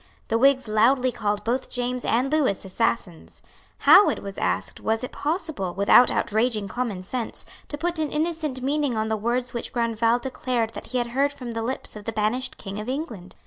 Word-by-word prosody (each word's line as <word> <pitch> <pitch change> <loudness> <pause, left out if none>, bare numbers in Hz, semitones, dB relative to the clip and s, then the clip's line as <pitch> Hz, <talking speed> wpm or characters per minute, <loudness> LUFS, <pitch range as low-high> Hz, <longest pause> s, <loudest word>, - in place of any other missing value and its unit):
The 225 - +2
Whigs 265 -1 +4
loudly 250 +4 +3
called 205 -2 -2
both 245 +4 -1
James 250 0 -2
and 255 +4 +1
Lewis 270 -12 +1
assassins. 190 -3 -2 0.3
How, 410 - +7
it - - -3
was 200 -1 -6
asked, - - -1
was 220 +1 -1
it 255 - -4
possible, 300 - -3
without 200 +5 +6
outraging 220 -1 0
common 225 -5 -3
sense, 235 +4 -4 0.2
to 290 - -5
put 345 +1 -2
an 305 -2 -1
innocent 305 -4 -2
meaning 280 -3 0
on 220 0 -1
the 220 - +1
words 240 +3 -1
which 235 - -4
Grandval 230 0 +1
declared 245 -2 -2
that - - -8
he 255 - -2
had 240 -1 -1
heard 280 +2 +2
from 250 -4 -7
the 230 0 -3
lips 245 +1 -3
of 210 -1 -9
the 225 - -2
banished 225 +4 -1
King 200 0 -6
of 215 +3 -5
England? 250 - -5
240 Hz, 195 wpm, -24 LUFS, 220-265 Hz, 0.3 s, How